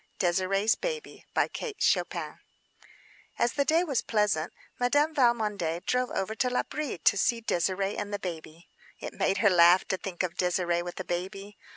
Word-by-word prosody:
DÉSIRÉE'S 190 +4 +2
BABY 475 -1 -5 2.1
As 235 - +1
the 285 - +1
day 325 +4 +3
was 280 -9 0
pleasant, 210 -8 0 0.3
Madame 290 +6 +2
Valmondé 210 - +1
drove 250 0 0
over 195 +3 -2
to 250 +3 0
L'Abri 270 +2 -2
to 170 - +3
see 230 +4 +1
Désirée 195 -1 -1
and 205 0 -4
the 205 - -1
baby. 165 -3 -8 0.3
It - - -7
made 195 - 0
her - - +8
laugh 175 +1 +6
to 190 - 0
think 185 -1 -4
of 175 -2 -2
Désirée 175 -1 0
with 175 +1 -7
a - - -3
baby. 195 +3 -5
195 Hz, 155 wpm, -28 LUFS, 175-245 Hz, 2.1 s, her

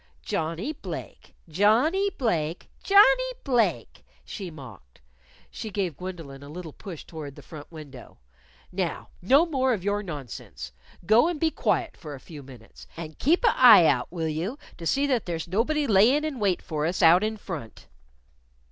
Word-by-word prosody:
"Johnnie 165 - -3
Blake! - - -9
Johnnie 235 - +3
Blake! 170 - -2
Johnnie - - +5
Blake!" 245 -5 0 0.2
she 195 -4 -6
mocked. 115 - -13 0.5
She 220 - -6
gave 190 -6 -2
Gwendolyn 165 -6 -8
a 140 - -11
little 165 -1 -8
push 180 -7 -9
toward 150 -4 -8
the - - -13
front 150 -1 -11
window. 145 -6 -12 0.5
"Now, - - -3
no 275 - +5
more 265 -6 +1
of 195 -6 -4
your 205 +1 0
nonsense. 145 - -8 0.3
Go 220 - +5
and 345 -3 -2
be 320 0 +1
quiet 345 +1 -1
for 150 -3 -9
a - - -11
few 150 +1 -11
minutes. 125 -4 -14
And 160 -2 -8
keep 335 - +2
a' 460 - +4
eye 220 -9 +8
out, 125 -3 +1
will 165 -2 -3
you, 170 - -3 0.2
to 165 - -5
see 275 - +2
that 255 -8 0
there's 165 -1 -3
nobody 255 - 0
layin' 245 +7 +4
in 290 -5 -4
wait 195 -4 0
for 155 -3 -2
us 175 +1 -1
out 170 +4 +6
in 220 0 -2
front?" 155 - -8
185 Hz, 165 wpm, -26 LUFS, 155-255 Hz, 0.5 s, eye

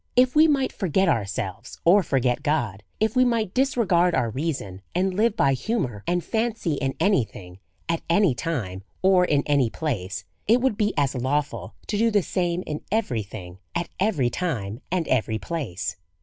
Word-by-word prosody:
If 250 +2 +4
we 310 +1 +7
might 275 -4 +1
forget 190 -1 +1
ourselves, 110 - -2
or 190 +5 +7
forget 130 -7 0
God, 120 -10 -1 0.2
if 220 +1 +1
we 255 - +5
might 230 -6 0
disregard 210 -10 +2
our 120 -3 +1
reason, 130 - -3
and 185 +1 +1
live 215 +2 +1
by 135 -1 +4
humour 130 - -2
and 175 0 +1
fancy 225 -7 -1
in 135 -2 -2
any 195 - +3
thing, 90 -3 -12 0.3
at 165 -1 0
any 175 -3 +4
time, 115 - -3 0.2
or 185 -1 +5
in 145 -4 +2
any 140 -5 +2
place, 105 - -3 0.2
it 230 +4 +5
would 260 -3 +1
be 210 0 +1
as 140 -2 +2
lawful 140 +3 -2
to 205 - -2
do 230 +1 +4
the 205 -3 +2
same 175 0 -1
in 150 0 -4
every 205 - 0
thing, 95 -3 -9 0.2
at 170 0 -1
every 160 - +1
time, 120 - -3
and 180 -3 0
every 110 -3 +1
place. 130 - -4
165 Hz, 180 wpm, -24 LUFS, 120-205 Hz, 0.3 s, we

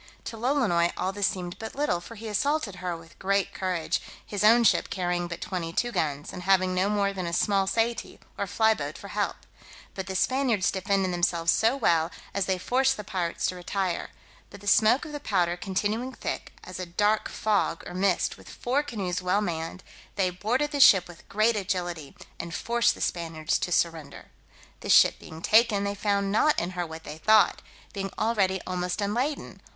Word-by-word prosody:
To - - -6
Lolonois 225 -9 +2
all 185 +1 -1
this 200 0 +1
seemed 180 -2 -4
but 220 0 -7
little, 275 -12 0
for 230 +6 -11
he 225 +1 -8
assaulted 220 -1 0
her 180 -2 -3
with 165 0 -17
great 195 0 0
courage, 180 -4 -1 0.2
his 205 -1 -3
own 230 +3 +6
ship - - +3
carrying 175 -1 -1
but 170 0 -7
twenty 175 -3 -3
two 240 +7 -1
guns, 145 -7 -2
and 180 - -6
having 185 0 +3
no 185 +2 +1
more 200 -1 +1
than 185 -3 -4
a - - -3
small 195 +1 +2
saety 230 +3 -1 0.2
or 200 - -3
fly 220 +3 +3
boat 150 -5 -5
for 200 - -10
help: 205 -1 -1 0.6
but 190 -1 -5
the 190 - -4
Spaniards 250 -4 +2
defended 195 -1 0
themselves 170 -1 +2
so 230 +5 +2
well, 165 -9 +2 0.2
as 200 -2 -1
they 190 -1 +1
forced 265 +7 +1
the 210 - -6
pirates 170 -3 -2
to 185 - -1
retire; 180 0 -2 0.4
but 205 - -12
the 205 - -14
smoke 220 +7 +4
of 305 - -8
the 295 - -5
powder 180 -9 +1
continuing 205 +7 -2
thick, - - -5
as 185 0 -8
a 185 - -4
dark 210 +5 +1
fog 205 -5 0
or - - -8
mist, 185 0 +1
with - - -14
four 260 +4 -1
canoes 195 -11 -3
well 180 +2 +1
manned, 170 -2 -4 0.3
they 190 -2 +1
boarded 245 +11 -1
the 290 - -2
ship 195 -8 +7
with 175 -2 -15
great 215 +3 +2
agility, 175 -6 -3 0.2
and 170 -1 -5
forced 235 0 +1
the - - -11
Spaniards 165 -2 -1
to 180 - -3
surrender. 165 -4 -1 0.5
The - - -7
ship - - +6
being 160 +1 -11
taken, 215 -2 +4
they 200 0 -1
found 200 -1 0
not 295 +8 +3
in 175 +2 -3
her 175 -2 -3
what 160 0 -9
they 155 - -8
thought, 215 +3 +4 0.3
being 195 -1 -3
already 200 -4 +1
almost 180 0 -2
unladen. 240 +9 -2
195 Hz, 195 wpm, -27 LUFS, 175-220 Hz, 0.6 s, ship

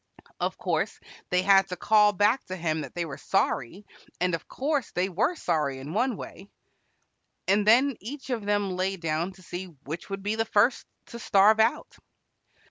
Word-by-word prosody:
Of - - -2
course - - -1 0.3
they 180 0 +2
had 195 0 +5
to 180 - -3
call 210 +3 +4
back 205 +6 +2
to 185 - -5
him 160 -3 -1
that - - -9
they 175 -1 -1
were 140 -3 -8
sorry, 160 - -1 0.3
and 180 0 +1
of 165 - -4
course 280 -3 -1
they 185 +2 0
were 215 - 0
sorry 150 - -1
in 140 +4 -7
one 240 +1 0
way, 200 - -10 1.0
and 200 +2 +2
then 255 +4 +5
each 270 +5 -7
of 230 -4 -2
them 205 -1 0
lay 190 +1 -1
down 165 +2 -2
to 185 0 -18
see 175 +2 -6 0.2
which 160 +8 -7
would 195 0 -5
be 205 +1 0
the 225 - +1
first 225 +4 +2 0.3
to 235 - -6
starve 210 0 +4
out. 225 +2 +1
195 Hz, 185 wpm, -27 LUFS, 175-220 Hz, 1.0 s, had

